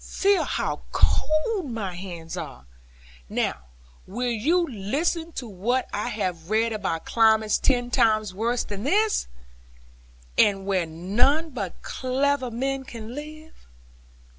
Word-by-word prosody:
Feel 400 0 +2
how - - -2
cold 310 - +1
my 205 -5 -3
hands 175 -3 -7
are. 65 - -7 0.6
Now, 65 - -1 0.4
will 245 +5 -1
you 320 +11 +2
listen 300 - -1
to 250 - -5
what 230 +6 0
I 205 - -1
have 180 -5 -3
read 225 +1 +2
about 190 -6 -2
climates 220 -2 +4
ten 245 -2 +1
times 215 -5 +3
worse 230 +5 0
than 205 -1 -6
this; 415 - +2 1.1
and 195 -2 +4
where 190 -4 +1
none 240 - +1
but 200 -9 -5
clever 260 0 0
men 265 +3 -2
can 230 -3 -8
live?' 310 - -10
230 Hz, 125 wpm, -25 LUFS, 200-280 Hz, 1.1 s, climates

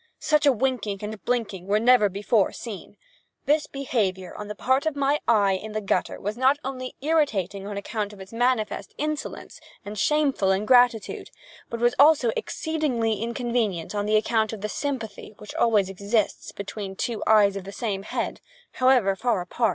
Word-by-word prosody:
Such 300 -1 +2
a - - +7
winking 245 -4 -1
and 210 -2 -6
blinking 205 -7 -2
were 205 +1 +3
never 235 -2 +5
before 200 +1 +1
seen. 220 -6 -8 0.5
This 300 +1 +2
behavior 205 -9 -2
on 210 - -7
the 210 - -6
part 260 +7 +1
of 315 - -1
my 285 +1 +1
eye 205 -4 +4
in 210 +3 -5
the 215 - -1
gutter 200 - -1
was 205 +2 -3
not 260 +3 +3
only 255 -1 -5
irritating 210 - 0
on 205 -1 -5
account 205 +1 -3
of 205 - -13
its 190 +3 -11
manifest 245 -2 0
insolence 305 0 -4 0.3
and 205 0 -6
shameful 295 - +2
ingratitude, 230 +3 +3 0.4
but 230 - -4
was 240 +1 +3
also 285 -5 +6
exceedingly 245 -10 -1
inconvenient 235 -7 -1
on 205 0 -2
account 220 0 +2
of 215 - -7
the 210 - -3
sympathy 230 -7 -4
which 210 - -10
always 215 -5 +3
exists 200 +3 -1
between 200 -1 -6
two 230 +2 -3
eyes 210 -2 +5
of 195 - -5
the 195 - -8
same 200 -2 -3
head, 200 - -4 0.3
however 255 -7 +3
far 235 0 0
apart. 220 +6 0
220 Hz, 170 wpm, -25 LUFS, 200-255 Hz, 0.5 s, a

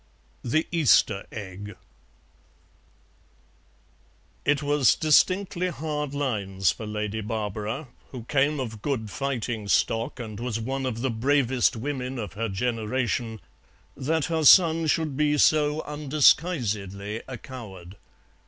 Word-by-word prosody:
THE 155 +7 +1
EASTER 130 - +3
EGG 100 -1 -8 2.7
It 145 0 +2
was 145 -2 +3
distinctly 185 +4 +2
hard 150 -3 -4
lines 100 - 0
for 105 +10 -7
Lady 105 0 -3
Barbara, 110 +5 -4 0.2
who 125 -4 -8
came 145 +4 +1
of 115 -5 -5
good 110 -7 -2
fighting 120 -4 -3
stock, 110 +7 0
and 110 -3 -7
was 120 -2 -3
one 135 +3 -3
of 115 -2 -4
the 130 -1 0
bravest 130 +1 +2
women 130 +1 -4
of 105 -7 -5
her 115 +1 -3
generation, 115 +1 -2 0.5
that 150 +3 -1
her 160 -1 -1
son 165 0 +6
should 155 -2 0
be 150 +1 +2
so 150 +1 +3
undisguisedly 125 - +1
a 130 -2 -6
coward. 100 -8 -10
125 Hz, 115 wpm, -26 LUFS, 110-145 Hz, 2.7 s, son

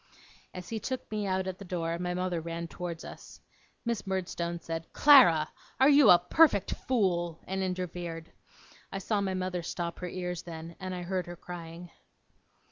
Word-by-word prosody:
As 180 -1 -8
he 225 - -3
took 260 +1 -5
me 210 -2 -2
out 190 0 0
at 185 -1 -5
the - - -8
door, 170 -2 -2
my 180 0 -2
mother 180 -2 -1
ran 170 +1 -5
towards 170 -1 -6
us. - - -11 0.5
Miss 230 -4 -2
Murdstone 175 -2 -2
said, 165 0 -6
'Clara! 205 - +7 0.3
are 265 +2 +7
you 290 -1 +7
a 180 - +10
perfect 200 - +4
fool?' 175 -9 0
and 190 +1 -2
interfered. 175 -3 -4 0.6
I - - -3
saw 200 +2 0
my 190 -1 -1
mother 185 -1 -2
stop 170 0 -4
her 180 - -4
ears 180 -1 -4
then, 165 0 -8
and 185 -1 -4
I 180 - -5
heard 185 0 -2
her 175 - -7
crying. 170 0 -9
180 Hz, 175 wpm, -30 LUFS, 170-190 Hz, 0.6 s, a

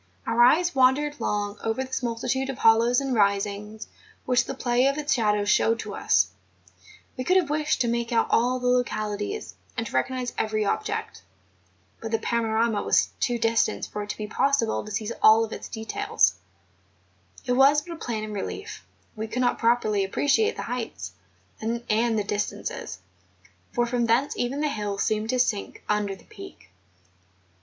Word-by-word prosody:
Our 235 - +1
eyes 335 +9 +5
wandered 275 +3 +2
long 205 0 -2
over 225 +4 -1
this 260 0 -4
multitude 250 +3 -2
of 265 - -4
hollows 230 +2 +4
and 270 -2 -2
risings 205 0 0 0.4
which 250 -1 +2
the 270 - -5
play 250 0 +2
of 275 - +1
the 300 -1 -5
shadows 210 -6 +2
showed 225 +2 +3
to 205 - -7
us; 90 - +2 0.8
we 255 - -4
could 365 +8 +3
have 330 -6 +1
wished 305 0 0
to 240 - +2
make 235 0 -1
out 230 - +3
all 245 +2 +3
the 250 - -6
localities, 240 - -1 0.2
and 230 - -1
to - - -8
recognise 245 - -1
every 215 -1 0
object; - - -3 0.8
but 225 - -4
the 225 - +1
panorama 225 -1 0
was - - +2
too 240 -1 0
distant 230 0 +1
for 210 - -6
it 205 - -7
to - - -4
be 215 - -4
possible 235 +1 +1
to 215 - -9
seize 215 +1 -3
all 225 +1 +6
its 220 - -8
details; 410 - +1 1.1
it 250 - -1
was 275 +4 +5
but 340 +1 -8
a - - -8
plan 225 -7 -4
in 215 0 -6
relief; 305 - -6 0.3
we 220 0 -4
could 250 +3 -1
not 245 - +1
properly 230 -4 +2
appreciate 290 - +1
the - - -5
heights 225 - -5 0.5
and 235 +2 -3 0.3
the 210 - +1
distances, 205 - -4 0.7
for 240 - +1
from 240 -1 0
thence 245 +5 +2
even 260 +4 -2
the 305 - +1
hills 205 -7 -2
seemed 215 0 -1
to 255 - +1
sink 220 -5 -1
under 210 -2 0
the - - -19
Peak. 95 -1 -13
235 Hz, 175 wpm, -25 LUFS, 215-255 Hz, 1.1 s, all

